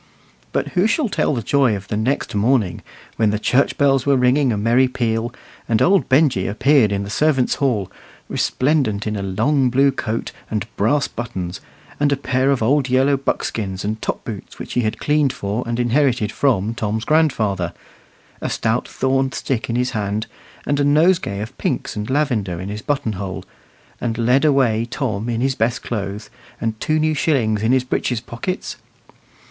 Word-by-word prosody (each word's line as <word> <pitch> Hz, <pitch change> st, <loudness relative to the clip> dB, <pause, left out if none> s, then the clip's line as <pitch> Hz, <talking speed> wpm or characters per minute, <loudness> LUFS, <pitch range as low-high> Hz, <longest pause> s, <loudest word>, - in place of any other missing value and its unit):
But -, -, -1 dB
who 180 Hz, +3 st, +2 dB
shall 235 Hz, +2 st, +1 dB
tell 150 Hz, -, 0 dB
the 120 Hz, -, -3 dB
joy 135 Hz, -2 st, +2 dB
of 95 Hz, -1 st, -7 dB
the -, -, -2 dB
next 115 Hz, +6 st, -1 dB
morning, 105 Hz, -2 st, +1 dB, 0.4 s
when 110 Hz, -2 st, +3 dB
the 105 Hz, -, 0 dB
church 125 Hz, +5 st, +1 dB
bells 135 Hz, -2 st, +3 dB
were 140 Hz, -1 st, +3 dB
ringing 125 Hz, +1 st, +3 dB
a 105 Hz, -, -1 dB
merry 120 Hz, +5 st, +3 dB
peal, 120 Hz, -2 st, -1 dB, 0.4 s
and 110 Hz, -2 st, +3 dB
old 195 Hz, +1 st, +3 dB
Benjy 130 Hz, -8 st, +3 dB
appeared 115 Hz, +2 st, +3 dB
in 100 Hz, 0 st, -1 dB
the 100 Hz, -, -6 dB
servants' 145 Hz, -3 st, +2 dB
hall, 105 Hz, -9 st, 0 dB, 0.4 s
resplendent 130 Hz, -7 st, 0 dB
in 105 Hz, -1 st, -2 dB
a 100 Hz, -, -3 dB
long 125 Hz, +8 st, +1 dB
blue 135 Hz, +3 st, +3 dB
coat 115 Hz, -3 st, -3 dB, 0.2 s
and 105 Hz, -2 st, -2 dB
brass 130 Hz, +8 st, +2 dB
buttons, 95 Hz, -7 st, -5 dB, 0.4 s
and 145 Hz, 0 st, +2 dB
a 140 Hz, -, +2 dB
pair 130 Hz, 0 st, 0 dB
of 135 Hz, -5 st, +1 dB
old 135 Hz, +3 st, +2 dB
yellow 135 Hz, +2 st, +3 dB
buckskins 100 Hz, -7 st, -2 dB
and 110 Hz, +1 st, -3 dB
top -, -, -3 dB
boots -, -, -7 dB
which -, -, -7 dB
he 125 Hz, -, +2 dB
had 110 Hz, -2 st, -1 dB
cleaned 150 Hz, -2 st, +2 dB
for 105 Hz, +3 st, -3 dB
and 120 Hz, 0 st, -2 dB
inherited 120 Hz, -3 st, +2 dB
from 115 Hz, -6 st, +1 dB
Tom's 110 Hz, 0 st, -2 dB
grandfather, 110 Hz, -, +1 dB, 0.7 s
a -, -, -2 dB
stout 115 Hz, +2 st, 0 dB
thorn 135 Hz, 0 st, 0 dB
stick 125 Hz, -5 st, -3 dB
in 115 Hz, -, -1 dB
his 125 Hz, +1 st, 0 dB
hand, 105 Hz, -1 st, -2 dB, 0.4 s
and 145 Hz, 0 st, 0 dB
a -, -, +3 dB
nosegay 150 Hz, -, +2 dB
of 110 Hz, -, -7 dB
pinks -, -, -2 dB
and 105 Hz, +2 st, -4 dB
lavender 120 Hz, -, 0 dB
in 95 Hz, +2 st, -5 dB
his 105 Hz, +1 st, -5 dB
buttonhole, 105 Hz, -10 st, -3 dB, 0.6 s
and 115 Hz, -2 st, -2 dB
led 125 Hz, +5 st, +3 dB
away 130 Hz, -7 st, +3 dB
Tom 120 Hz, -5 st, -2 dB
in 115 Hz, 0 st, -1 dB
his 135 Hz, +1 st, +1 dB
best 120 Hz, 0 st, -1 dB
clothes, 105 Hz, -2 st, -4 dB, 0.3 s
and 110 Hz, -1 st, -2 dB
two 155 Hz, -, +1 dB
new 155 Hz, 0 st, +2 dB
shillings 120 Hz, -9 st, +1 dB
in 110 Hz, +2 st, +2 dB
his 130 Hz, -1 st, +3 dB
breeches 125 Hz, -1 st, -1 dB
pockets? 125 Hz, -, -5 dB
120 Hz, 180 wpm, -20 LUFS, 110-140 Hz, 0.7 s, when